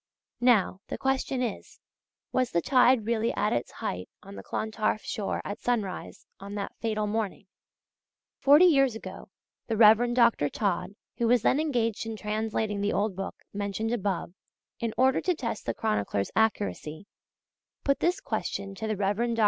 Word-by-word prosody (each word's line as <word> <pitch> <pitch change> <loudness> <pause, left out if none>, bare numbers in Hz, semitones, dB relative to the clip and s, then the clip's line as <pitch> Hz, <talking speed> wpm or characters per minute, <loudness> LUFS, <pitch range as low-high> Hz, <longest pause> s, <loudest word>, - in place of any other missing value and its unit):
Now, 230 -6 +3
the - - -4
question 265 -1 0
is, 230 -5 -5 0.5
was 255 -1 +1
the 170 - +1
tide 250 -3 +4
really 230 0 +1
at 210 - +1
its 120 - -1
height 90 0 -4
on 195 - -11
the - - -8
Clontarf 215 -1 -2
shore 205 -2 -3
at 205 +2 -5
sunrise 220 -6 -3
on 200 +1 -8
that 200 -1 -4
fatal 215 -2 -1
morning? 210 -2 -2 0.9
Forty 295 +6 +7
years 275 -8 +4
ago, 225 - -9 0.4
the 225 - -1
Rev. 230 +2 +6
Dr. 235 - +4
Todd, 195 0 -2 0.2
who 235 - +2
was 240 -1 +3
then 275 - +3
engaged 235 -8 0
in 225 - -4
translating 215 -1 -2
the 205 - 0
old 205 -1 0
book 195 +1 -5 0.2
mentioned 205 +3 -2
above, 195 -6 -2 0.5
in 230 -1 -1
order 260 +1 +3
to 360 - +1
test 230 -7 -4
the 115 - +1
chronicler's 100 -1 -1
accuracy, 205 -6 0 0.8
put 275 -1 +2
this 355 +2 +1
question 195 0 -3
to 220 +3 -5
the 215 -1 -1
Rev. 200 +1 0
Dr. 235 0 0
220 Hz, 165 wpm, -28 LUFS, 200-240 Hz, 0.9 s, Forty